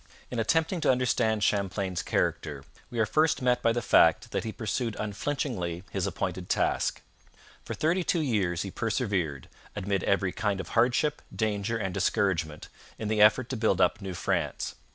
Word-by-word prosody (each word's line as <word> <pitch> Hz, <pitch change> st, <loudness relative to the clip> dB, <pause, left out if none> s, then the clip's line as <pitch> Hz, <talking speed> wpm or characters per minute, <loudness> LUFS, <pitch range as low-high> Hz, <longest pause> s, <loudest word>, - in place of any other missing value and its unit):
In 125 Hz, -, -2 dB
attempting 160 Hz, -, +1 dB
to -, -, +4 dB
understand 120 Hz, -4 st, +1 dB
Champlain's 95 Hz, -2 st, 0 dB
character, 75 Hz, -3 st, -1 dB, 0.3 s
we 120 Hz, -, -7 dB
are 110 Hz, -, +3 dB
first 155 Hz, +7 st, +2 dB
met 125 Hz, -2 st, +2 dB
by 115 Hz, -, +3 dB
the 120 Hz, 0 st, -1 dB
fact 95 Hz, +7 st, +4 dB
that -, -, -1 dB
he 110 Hz, -, -3 dB
pursued 115 Hz, +1 st, -2 dB
unflinchingly 105 Hz, -, -3 dB
his -, -, -1 dB
appointed -, -, -3 dB
task. -, -, 0 dB, 0.6 s
For -, -, -5 dB
thirty 170 Hz, +4 st, +1 dB
two 170 Hz, -1 st, +1 dB
years 95 Hz, -, 0 dB
he 95 Hz, -, -6 dB
persevered, 100 Hz, -, -1 dB, 0.3 s
amid 100 Hz, -2 st, -1 dB
every 95 Hz, -1 st, +1 dB
kind 105 Hz, -1 st, -1 dB
of -, -, -6 dB
hardship, 125 Hz, +6 st, +2 dB
danger, 110 Hz, 0 st, -1 dB
and 95 Hz, -4 st, -3 dB
discouragement, 90 Hz, -5 st, 0 dB, 0.3 s
in 110 Hz, -, -4 dB
the 110 Hz, -1 st, +2 dB
effort 110 Hz, +4 st, +5 dB
to 130 Hz, -, -2 dB
build 110 Hz, -5 st, +1 dB
up 90 Hz, +3 st, +2 dB
New 95 Hz, -2 st, -5 dB
France. -, -, -1 dB
110 Hz, 170 wpm, -28 LUFS, 95-125 Hz, 0.6 s, effort